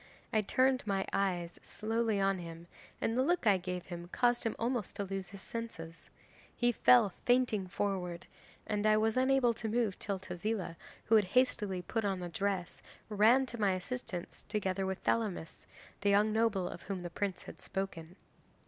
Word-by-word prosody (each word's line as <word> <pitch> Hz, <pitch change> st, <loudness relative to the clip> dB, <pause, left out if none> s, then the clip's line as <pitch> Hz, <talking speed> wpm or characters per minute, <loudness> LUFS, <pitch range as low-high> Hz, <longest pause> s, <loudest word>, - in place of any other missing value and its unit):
I 215 Hz, -, +4 dB
turned 255 Hz, +5 st, +2 dB
my 195 Hz, -1 st, 0 dB
eyes 175 Hz, -3 st, -1 dB
slowly 225 Hz, -1 st, -1 dB
on 195 Hz, -1 st, +2 dB
him, 165 Hz, -1 st, -8 dB, 0.3 s
and 225 Hz, -, 0 dB
the 255 Hz, -, +3 dB
look 340 Hz, +1 st, +1 dB
I 205 Hz, -3 st, +6 dB
gave 180 Hz, 0 st, -4 dB
him 175 Hz, -1 st, -7 dB
caused 240 Hz, +5 st, +2 dB
him 225 Hz, -, 0 dB
almost 235 Hz, -4 st, -2 dB
to 200 Hz, -, -2 dB
lose 195 Hz, -1 st, -4 dB
his 195 Hz, 0 st, -10 dB
senses. 165 Hz, -8 st, -7 dB, 0.5 s
He 240 Hz, -1 st, +3 dB
fell 235 Hz, -3 st, +5 dB
fainting 245 Hz, -6 st, +3 dB
forward, 180 Hz, -3 st, -2 dB, 0.4 s
and 210 Hz, 0 st, 0 dB
I 215 Hz, 0 st, +5 dB
was 220 Hz, 0 st, +2 dB
unable 260 Hz, -2 st, +4 dB
to 225 Hz, 0 st, -4 dB
move 220 Hz, -3 st, 0 dB
till 200 Hz, -2 st, -2 dB
Tezila, 185 Hz, 0 st, -3 dB, 0.3 s
who 225 Hz, -, +1 dB
had 210 Hz, -, +3 dB
hastily 210 Hz, -8 st, +2 dB
put 225 Hz, +5 st, -2 dB
on 190 Hz, -3 st, -1 dB
a 175 Hz, -, -4 dB
dress, 190 Hz, 0 st, -2 dB, 0.3 s
ran 220 Hz, +6 st, +5 dB
to 235 Hz, -3 st, -6 dB
my 195 Hz, -2 st, +3 dB
assistance 185 Hz, -2 st, -5 dB
together 195 Hz, -2 st, -1 dB
with 190 Hz, 0 st, -2 dB
Thelamis, 205 Hz, -8 st, -1 dB, 0.3 s
the 205 Hz, -, +1 dB
young 210 Hz, +2 st, +4 dB
noble 220 Hz, -5 st, +2 dB
of -, -, -7 dB
whom 190 Hz, -3 st, -5 dB
the 175 Hz, -, -5 dB
Prince 190 Hz, 0 st, -3 dB
had -, -, -11 dB
spoken. 180 Hz, -3 st, -5 dB
200 Hz, 175 wpm, -33 LUFS, 185-225 Hz, 0.5 s, I